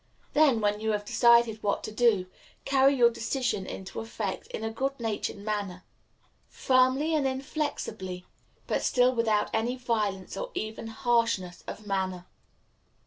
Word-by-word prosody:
Then, 285 -7 +4
when 210 0 +1
you 220 0 0
have 205 0 -2
decided 235 -1 +4
what 200 -1 -1
to - - -5
do, 215 -4 +3 0.4
carry 275 0 +4
your 240 -2 +5
decision 230 -4 -2
into 190 0 -6
effect 225 -3 -4
in - - -6
a 220 - -2
good 270 +4 -2
natured 220 -3 -2
manner 200 -3 -4 0.7
firmly 260 +4 +2
and 295 -3 +2
inflexibly 260 - -4 0.4
but - - -1
still 250 0 +3
without 225 -3 +1
any 230 +3 0
violence, 215 -6 -2
or - - -4
even 220 +1 -4
harshness, 225 -5 0
of 215 - -7
manner. 190 -3 -2
225 Hz, 140 wpm, -28 LUFS, 205-255 Hz, 0.7 s, your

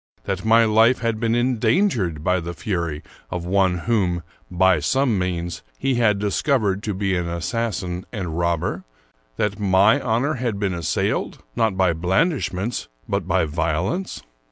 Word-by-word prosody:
that 95 -1 -3
my 115 +1 +5
life 110 +3 +4
had 115 -2 -1
been 115 0 +1
endangered 120 - +1
by 90 +2 +2
the 85 0 -6
fury 85 -6 -3 0.3
of 90 -1 -4
one 95 -1 +2
whom, 90 -7 +1 0.3
by 95 -1 +3
some 125 - +1
means, 85 -2 -3 0.2
he 135 - 0
had 115 -4 +3
discovered 105 0 +1
to 105 -2 -3
be 95 -1 0
an 90 -1 -1
assassin 90 0 -2
and 90 -8 -4
rob 85 -1 0
ber? - - -3 0.5
that 105 0 -1
my 100 +6 +4
honor 125 +5 +1
had 120 -6 -2
been 100 -2 -1
assailed, 85 -3 -2
not 110 -4 +1
by 95 -3 +3
blandishments, 100 - 0 0.2
but - - -2
by - - +2
violence? 85 - -2
100 Hz, 155 wpm, -22 LUFS, 90-115 Hz, 0.5 s, my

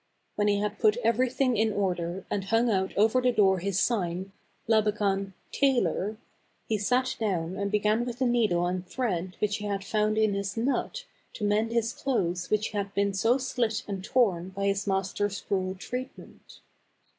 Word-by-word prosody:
When 210 0 0
he 205 -1 +3
had 210 +1 -2
put 215 0 +4
everything 250 +2 +2
in 220 +1 +2
order, 180 -2 -2
and 195 -2 -1
hung 225 +3 +2
out 190 -2 0
over 225 +5 +4
the 250 0 +3
door 195 -5 +3
his 195 +1 -1
sign, 190 -4 -1 0.2
" - - -40
Labakan 205 -3 +1
— - - -39
Tailor," 215 - +2 0.5
he 215 -2 0
sat 250 +5 +1
down 185 -5 -1
and 200 0 -2
began 210 +2 +2
with 240 -1 -5
the 260 - +1
needle 220 -8 +2
and 180 0 -2
thread 185 -6 -2
which 210 -1 0
he 210 - -6
had 200 -1 -2
found 215 +1 0
in 215 -2 +3
his 200 +1 -3
nut 275 - -1 0.3
to - - -7
mend 210 +2 +1
his 230 -1 0
clothes 180 -9 -1
which 215 0 +1
slit 215 +4 0
and 195 -2 -4
torn 190 -7 +1
by 200 +1 -3
his 200 0 0
master's 195 +1 -1
cruel 190 -2 -1
treatment. 250 +7 -8
205 Hz, 170 wpm, -28 LUFS, 195-230 Hz, 0.5 s, put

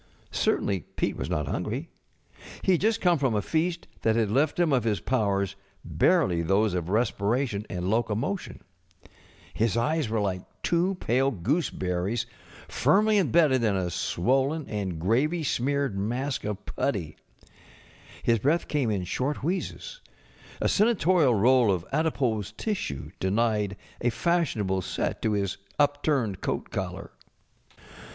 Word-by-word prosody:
Certainly 100 -2 +1 0.2
Pete - - -1
w^as - - -4
not 75 -1 -1
hungry. 120 - -3 0.7
He 190 - +3
had 175 - +3
just 220 +2 +2
come 175 -4 +3
from 130 -5 +1
a 105 - +1
feast 170 +2 -1
that 110 -1 +2
had 110 -3 +1
left 145 +8 +1
him 170 -4 +3
of 125 -4 +2
his 105 -4 0
powders 100 -3 0 0.3
barely 85 - +2
those 95 +4 +2
of 90 -1 -2
respiration 110 +1 0
and 90 0 -3
locomotion. 115 - -1 0.9
His 115 0 +1
eyes 150 +2 +1
were 110 0 0
like 95 -3 -1 0.2
tw^o 180 +2 +1
pale 130 +3 +2
gooseberries 100 - -1 0.4
firmly 210 - +3
imbedded 145 - +3
in 105 -3 +2
a 90 -2 -1
swol┬¼ 130 +12 +1
len 155 -1 -4
and 100 -5 -3
gravy 135 - +1
smeared 140 -3 0
mask 120 +7 -2
of 105 -1 -4
putty. 90 - -2 1.1
His 115 -1 +3
breath 150 +9 +1
came 140 -6 0
in 100 -4 -1
short 130 +11 -2
wheezes; 190 - -3 0.6
a - - +1
senatorial 185 - +3
roll 120 +1 +4
of 90 -2 -1
adipose 130 - 0
tissue 185 - -3
denied 105 0 0 0.2
a 120 - +2
fashionable 115 - 0
set - - -3
to 110 - +1
his 100 -2 -1 0.2
upturned 145 -8 +1
coat - - -3
collar. - - -4
120 Hz, 140 wpm, -27 LUFS, 100-150 Hz, 1.1 s, roll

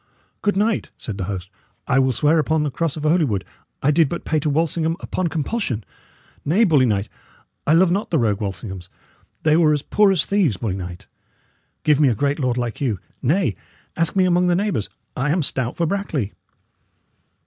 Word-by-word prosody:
"Good 205 -2 +1
knight," 215 +2 +1
said 105 -4 -6
the 95 - -1
host, 95 -1 -5 0.4
"I 135 - +3
will 130 -1 +3
swear 150 +7 +3
upon 155 +1 +1
the 145 - -1
cross 165 +1 -2
of 150 - -5
Holywood 150 - +2 0.4
I 145 - +4
did 155 -1 +3
but 170 - -5
pay 155 - +1
to 150 - -1
Walsingham 165 +2 0
upon 185 - -2
compulsion. 155 - -2 0.6
Nay, 180 +10 +3
bully 150 - +4
knight, 100 -2 0 0.6
I 155 - +5
love 170 +1 +5
not 200 +4 -1
the 165 - +2
rogue 110 -5 +1
Walsinghams; 95 -2 -5 0.5
they 155 -1 +4
were 160 -2 +4
as 145 -1 -1
poor 210 -2 +4
as 180 -6 +2
thieves, 185 - +1
bully 100 -2 -2
knight. 90 +1 -7 0.8
Give 150 -2 +4
me 150 - +5
a 120 - +1
great 140 +6 0
lord 125 -3 0
like 120 0 -3
you. 120 -8 0 0.2
Nay; 140 - +1 0.4
ask 165 +1 0
me 190 -1 +4
among 180 0 +3
the 175 - +3
neighbours, 180 - -1 0.3
I 135 +3 0
am 165 +2 +2
stout 130 -3 -2
for 170 - +1
Brackley." 160 - -2
150 Hz, 190 wpm, -21 LUFS, 115-170 Hz, 0.8 s, I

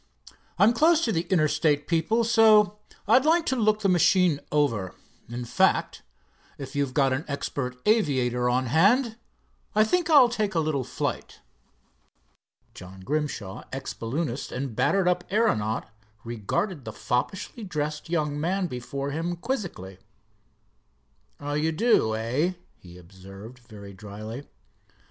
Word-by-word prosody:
I'm 215 +4 +5
close 320 +6 +3
to 230 - 0
the 170 -3 -1
Interstate 155 -4 +2
people, 170 +8 +1
so 215 -2 +4 0.3
I'd 250 +5 +5
like 325 +2 +3
to 265 - 0
look 215 -3 +1
the 200 - +2
machine 180 -3 +3
over. 115 -11 0 0.3
In 120 +1 -5
fact, - - +1 0.6
if 135 -1 -8
you've 140 -2 -1
got 135 -2 +3
an 135 +4 -2
expert 140 -3 -4
aviator 130 - +2
on 130 +1 +1
hand, 220 - +3 0.6
I 215 - +5
think 340 +9 0
I'll 285 -6 +7
take 215 -5 -2
a - - +3
little 155 -4 -1
flight." - - -5 1.3
John 95 +1 -12
Grimshaw, 115 -5 -3
ex 130 -4 -5
balloonist 120 +5 -4
and 130 -3 -4
battered 195 - +2
up 180 0 +1
aeronaut, 115 - 0 0.4
regarded 120 - -3
the 110 - -7
foppishly 190 - -3
dressed 150 -4 -4
young 150 -3 -1
man 185 +5 0
before 140 0 -5
him 165 +4 -2
quizzically. 170 - -5 1.4
"Oh, 145 0 -4
you 155 +2 0
do, 160 - +2
eh?" 130 +11 -1 0.3
he 90 -1 -14
observed, 95 +6 -13
very 105 -4 -12
dryly. 105 +6 -8
150 Hz, 135 wpm, -26 LUFS, 120-200 Hz, 1.4 s, I'll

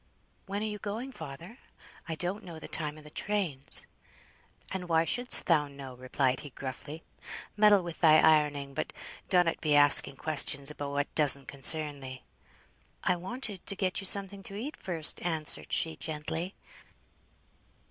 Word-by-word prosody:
"When 200 +2 -4
are - - -2
you 210 -1 -5
going, 220 +6 -6
father? 165 - -10 0.5
I 160 - -3
don't 180 +6 -4
know 170 -3 -10
the 160 - -9
time 150 -1 -2
o' 155 - -14
the 150 - -14
trains." 185 -11 -1 0.9
"And 180 -2 -5
why 165 0 +2
shouldst 245 +7 0
thou 150 -4 +2
know?" 140 -2 -10
replied 130 +1 -1
he, 145 - -9
gruffly. 140 +4 -8 0.5
"Meddle 205 -2 +4
with 170 -2 -8
thy 155 -2 +6
ironing, 150 -3 +2
but - - -5 0.4
donnot 180 -3 +1
be 150 -2 +1
asking 145 -1 +6
questions 145 -1 0
about 145 -1 -6
what 145 0 -3
doesn't 140 -3 +4
concern 145 +1 +1
thee." 130 -1 -10 0.8
"I 180 - +2
wanted 200 +2 -6
to 200 - -2
get 190 -1 -2
you 195 - +7
something 200 0 +7
to 195 - -7
eat 260 +9 -6
first," 165 -4 0
answered 160 -3 -3
she, 160 -1 0
gently. 160 +4 -5
160 Hz, 155 wpm, -29 LUFS, 145-190 Hz, 0.9 s, you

